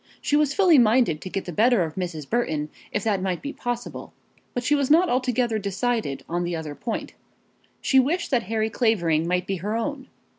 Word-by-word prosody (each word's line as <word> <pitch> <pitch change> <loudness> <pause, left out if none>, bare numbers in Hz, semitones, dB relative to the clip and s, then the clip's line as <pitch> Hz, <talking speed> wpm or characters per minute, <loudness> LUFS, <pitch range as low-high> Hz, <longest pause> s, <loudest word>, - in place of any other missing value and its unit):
She 290 - 0
was 295 -2 +2
fully 360 -7 +6
minded 225 -8 +3
to 185 - -6
get 195 - -3
the 175 - -5
better 220 +3 +3
of 160 -2 -4
Mrs. 170 -6 -5
Burton 155 -11 -1 0.2
if 205 - -2
that 205 -4 0
might 185 -2 -1
be 285 +1 -6
possible, 245 -1 -5 0.4
but 245 - -1
she 290 - +2
was 280 -2 +1
not 340 +4 +5
altogether 250 -3 +1
decided 200 - -2
on 175 +1 -1
the 175 0 -2
other 160 -2 -5
point. 225 +9 -5 0.7
She 265 - +4
wished 325 +7 0
that 250 -3 +3
Harry 220 -1 0
Clavering 170 -9 +1
might 180 0 0
be 195 0 -2
her 210 +6 -2
own. 265 +3 -4
220 Hz, 200 wpm, -24 LUFS, 180-255 Hz, 0.7 s, fully